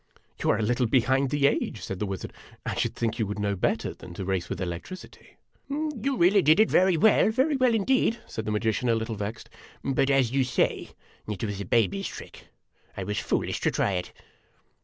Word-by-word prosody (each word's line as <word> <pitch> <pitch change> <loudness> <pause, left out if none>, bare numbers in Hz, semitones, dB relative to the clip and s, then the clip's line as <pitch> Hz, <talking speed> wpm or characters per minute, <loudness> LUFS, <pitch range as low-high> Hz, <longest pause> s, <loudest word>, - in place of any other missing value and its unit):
"You - - +1
are - - +3
a 110 - -1
little 120 +2 +1
behind 130 +3 +2
the 145 +1 +1
age," 120 -7 0
said 95 - -5
the 105 - -1
wizard. 95 -1 -5 0.3
"I - - -2
should - - -1
think 115 0 -2
you 110 - 0
would 105 - -4
know 100 -1 -1
better 90 - -1
than 85 - -12
to 95 - -5
race 95 -2 -2
with 95 - -4
electricity! 90 - -7
" - - -37
" - - -42 0.3
You 275 +1 0
really 190 +3 +5
did 155 +3 +5
it 220 - +4
very 185 -2 +4
well, 215 +4 +5
very 265 +7 +1
well, 255 -3 +3
indeed," 230 +1 +2
said 110 - -6
the 110 - -2
magi 110 +1 +1
cian, 125 +2 -1
a 115 - +4
little 115 0 -3
vexed; 105 +2 -5 0.4
"but, 135 0 +1
as 135 -4 +3
you 135 0 +2
say, 125 - 0 0.4
it 105 +1 -4
was 100 -2 -3
a - - -5
baby's 100 -2 +1
trick; - - -10 0.5
I 95 - -3
was 105 +3 -2
foolish - - -1
to - - +1
try - - 0
it." 90 -2 -3
115 Hz, 225 wpm, -26 LUFS, 100-155 Hz, 0.5 s, really